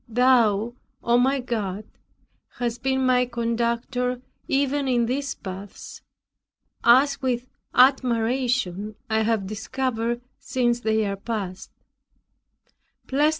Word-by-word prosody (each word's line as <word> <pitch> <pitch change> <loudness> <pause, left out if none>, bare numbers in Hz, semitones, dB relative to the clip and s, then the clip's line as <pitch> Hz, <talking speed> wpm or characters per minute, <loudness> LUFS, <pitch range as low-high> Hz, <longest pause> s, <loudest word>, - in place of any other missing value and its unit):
Thou, 235 -2 +3 0.3
O 235 +1 +3
my 270 +2 +2
God, 215 -5 -3 0.7
hast 240 -1 -2
been 265 0 +1
my 250 -1 +3
conductor 235 +1 -1 0.3
even 280 0 +1
in 240 -2 +2
these 275 +3 -2
paths, 190 +1 -9 0.8
as 275 +4 +5
with 250 -2 -1 0.3
admiration 245 -5 +2 0.2
I 220 0 +3
have 220 -2 +1
discovered 230 +3 -2 0.2
since 240 -2 0
they 220 -2 +1
are 200 -1 -2
past. 195 -3 -5
240 Hz, 100 wpm, -24 LUFS, 220-255 Hz, 0.8 s, as